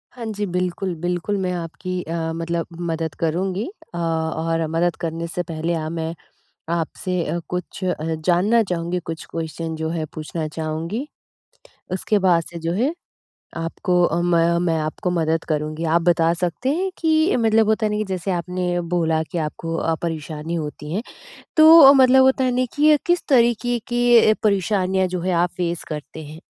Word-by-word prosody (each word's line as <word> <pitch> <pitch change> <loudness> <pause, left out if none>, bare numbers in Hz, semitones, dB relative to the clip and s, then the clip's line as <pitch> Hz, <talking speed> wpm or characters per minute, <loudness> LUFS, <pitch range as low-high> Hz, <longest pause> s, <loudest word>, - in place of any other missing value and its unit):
हाँ 240 -2 -6
जी। 205 0 -2
बिल्कुल, 180 0 -2
बिल्कुल, 175 +4 -2
मैं 185 -1 -1
आपकी 175 +2 -4
अ, 165 0 -3
मतलब 165 0 -2 0.2
मदद 160 -1 -3
करूँगी। 185 +5 -1 0.3
अ, - - -5
और 165 0 -1
मदद 165 +2 0
करने 165 0 -3
से 175 +1 -3
पहले 165 0 -3
अ, 155 -1 -2
मैं 165 0 -3 0.6
आपसे 170 +1 -2
कुछ 180 +1 -5
अ, 180 -1 0 0.3
जानना 195 +6 +3
चाहूँगी, 175 -1 -2
कुछ 165 -1 -7
क्वेश्चन 165 0 -4
जो 160 0 -3
है 160 -1 -2
पूछना 155 0 -4
चाहूँगी, 160 - -4 0.9
उसके 205 +3 +1
बाद 170 -2 +4
से 170 - -7
जो 165 0 -2
है 245 - +1 0.6
आपको 175 +2 0
अ, 170 0 +1
मैं 170 -1 +3
मैं 165 -1 +1
आपको 155 +4 -2
मदद 165 -1 0
करूँगी। 155 +1 -2
आप 165 +1 +2
बता 165 -1 +3
सकते 175 +8 -2
हैं 380 +3 -1
कि 320 +1 +2
मतलब 225 -2 +3
होता 220 0 +2
है - - 0
ना - - 0
कि 215 - 0
जैसे 185 0 -3
आपने 180 0 -1
बोला 160 -2 +1
कि 175 - -3
आपको 165 +1 -4
अ, 165 0 0
परेशानी 160 -1 -4
होती 150 -1 -5
है, 205 +6 -1 0.5
तो 315 -3 +10
मतलब 265 -1 +6
होता 265 0 +3
है 255 - +2
ना, 255 - +2
कि 300 +1 +6
किस 350 0 +2
तरीके 240 -2 +3
की 240 -2 +5
परेशानियाँ 190 -2 +1
जो 180 -1 -3
है 185 +1 -1
आप 175 +1 +2
फेस 175 -1 -2
करते 155 +1 -7
हैं? 155 +2 -11
175 Hz, 170 wpm, -22 LUFS, 165-200 Hz, 0.9 s, तो